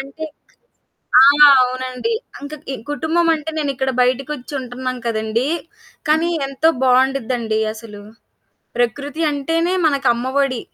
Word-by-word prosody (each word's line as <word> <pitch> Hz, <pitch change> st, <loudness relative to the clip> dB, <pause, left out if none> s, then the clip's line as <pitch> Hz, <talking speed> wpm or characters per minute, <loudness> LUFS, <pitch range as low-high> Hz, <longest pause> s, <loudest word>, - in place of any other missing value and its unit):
అంటే 275 Hz, +4 st, -7 dB, 1.0 s
ఆ! -, -, +9 dB, 0.4 s
అవునండి. 255 Hz, -, -2 dB, 0.3 s
ఇంక 285 Hz, +1 st, -8 dB, 0.2 s
ఈ -, -, -3 dB, 0.2 s
కుటుంబం 320 Hz, +3 st, 0 dB
అంటే, 310 Hz, 0 st, -5 dB
నేనిక్కడ 270 Hz, -3 st, -1 dB
బయటికొచ్చి 260 Hz, +2 st, -2 dB
ఉంటున్నాను 255 Hz, 0 st, -5 dB
కదండీ! 225 Hz, +3 st, -1 dB, 0.6 s
కానీ 315 Hz, +3 st, +2 dB, 0.2 s
ఎంతో 275 Hz, +4 st, +1 dB
బావుండుద్దండి 250 Hz, -3 st, +1 dB, 0.2 s
అసలు. 210 Hz, -2 st, -11 dB, 0.7 s
ప్రకృతి 280 Hz, +6 st, -2 dB
అంటేనే, 330 Hz, +5 st, -1 dB
మనకు 280 Hz, -3 st, +1 dB
అమ్మ 240 Hz, +2 st, -4 dB, 0.2 s
ఒడి. 255 Hz, -4 st, -1 dB
265 Hz, 110 wpm, -19 LUFS, 250-295 Hz, 1.0 s, ఆ